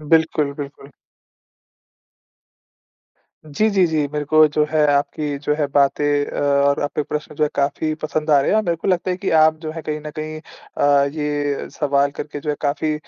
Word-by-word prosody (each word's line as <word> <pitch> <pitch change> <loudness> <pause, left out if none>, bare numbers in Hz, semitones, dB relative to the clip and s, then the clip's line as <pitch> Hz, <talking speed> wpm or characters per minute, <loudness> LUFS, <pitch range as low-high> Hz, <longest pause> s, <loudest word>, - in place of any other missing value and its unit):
बिल्कुल, 155 -2 +1
बिल्कुल। 140 -1 -9 2.5
जी, 210 +9 +1
जी, 190 -3 +3
जी। 155 -3 0
मेरे 150 -1 -2
को 155 +1 +5
जो 150 - +3
है, 155 -1 +3
आपकी 145 0 -1
जो 150 - +1
है 145 - +1
बातें 145 +1 +1
और 140 0 +2
आपके 145 +1 -2
प्रश्न 150 +1 -5
जो 155 - +1
है 150 - 0
काफ़ी 145 +2 0
पसंद 155 0 -2
आ 145 -2 +6
रहे - - 0
हैं 215 - +3
और 215 - +3
मेरे 170 -1 0
को 165 - -4
लगता 185 0 +1
है 180 - -1
कि 195 0 -3
आप 155 0 +5
जो 155 - -4
हैं, 165 -1 -7
कहीं 150 0 -4
न 150 0 -7
कहीं 155 0 -5 0.4
अ, 140 -1 +4
ये 145 -2 -2
सवाल 140 -1 +1
करके 145 0 -7
जो 150 - -2
है, 145 - -2
काफ़ी 150 +1 -1
150 Hz, 195 wpm, -20 LUFS, 145-155 Hz, 2.5 s, आ